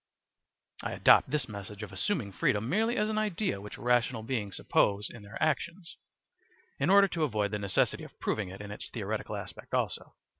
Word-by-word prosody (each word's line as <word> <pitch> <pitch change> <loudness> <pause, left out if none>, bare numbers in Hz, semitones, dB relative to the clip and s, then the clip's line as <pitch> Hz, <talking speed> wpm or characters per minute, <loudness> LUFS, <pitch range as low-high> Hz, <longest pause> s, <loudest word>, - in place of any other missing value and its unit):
* - - -21
I - - -3
adopt - - +6
this 150 +2 0
method 100 0 -7
of 105 - -7
assuming 100 - 0
freedom 105 +3 +1
merely 225 - +1
as 210 - +2
an 215 0 0
idea 205 - -1
which 105 - -8
rational 120 -1 +1
beings 110 -5 -2
suppose 100 0 +2
in 115 - -11
their 100 +2 -9
actions, 165 +3 -1 0.8
in 140 - +2
order 200 +1 +7
to 165 -3 -1
avoid 105 -7 0
the 105 - -1
necessity 100 -3 +1
of - - -13
proving 105 -4 -1
it 95 +2 -8
in 105 0 -7
its 105 - -6
theoretical - - -3
aspect - - -6
also. - - -1
115 Hz, 190 wpm, -30 LUFS, 105-170 Hz, 0.8 s, order